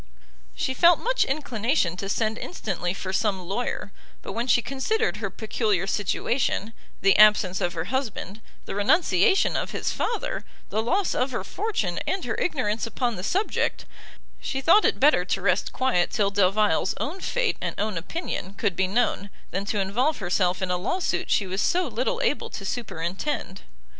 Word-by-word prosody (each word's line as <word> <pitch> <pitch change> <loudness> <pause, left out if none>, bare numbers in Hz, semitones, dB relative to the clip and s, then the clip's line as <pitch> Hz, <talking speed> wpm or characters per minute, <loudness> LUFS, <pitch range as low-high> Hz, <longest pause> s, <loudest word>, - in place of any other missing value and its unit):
She 260 - -1
felt 340 +4 +6
much - - +1
inclination 245 - 0
to 195 +1 -4
send 220 +1 0
instantly 190 - -3
for 190 0 -5
some 200 -1 +1
lawyer; 200 +2 -3 0.3
but - - -6
when 235 +2 -2
she 240 -2 +4
considered 435 - -1
her - - -3
peculiar 215 -4 -1
situation, 215 +2 -1 0.3
the 195 0 +5
absence 210 -4 +5
of 175 - 0
her 160 - -2
husband, 220 -2 -3 0.2
the - - -5
renunciation 230 - +3
of - - -1
his - - -1
father, 470 - -2 0.3
the 220 - +1
loss 370 - +1
of 255 - 0
her 235 -7 -3
fortune, 215 - -2
and 380 - -1
her - - -1
ignorance 230 -9 -1
upon 240 +1 -1
the 180 - -6
subject, 390 - 0 0.5
she 270 - -3
thought 340 +10 +5
it - - +2
better 280 -9 +5
to 190 - -1
rest 185 0 +1
quiet 255 -9 +1
till 200 -3 +1
Delvile's 200 -1 +2
own 340 +7 -3
fate, - - 0
and - - -3
own 210 -1 -1
opinion 190 - -4
could 200 -4 -1
be 190 - +1
known, 200 -1 0 0.2
than 195 +2 -2
to 205 0 -1
involve 240 +11 +1
herself 180 -1 0
in 185 - -1
a 180 - +1
lawsuit 345 - -1
she 200 - +2
was 190 +2 -2
so 360 +1 +2
little - - -1
able 480 - 0
to - - -7
superintend. 195 - -3
215 Hz, 175 wpm, -25 LUFS, 190-275 Hz, 0.5 s, felt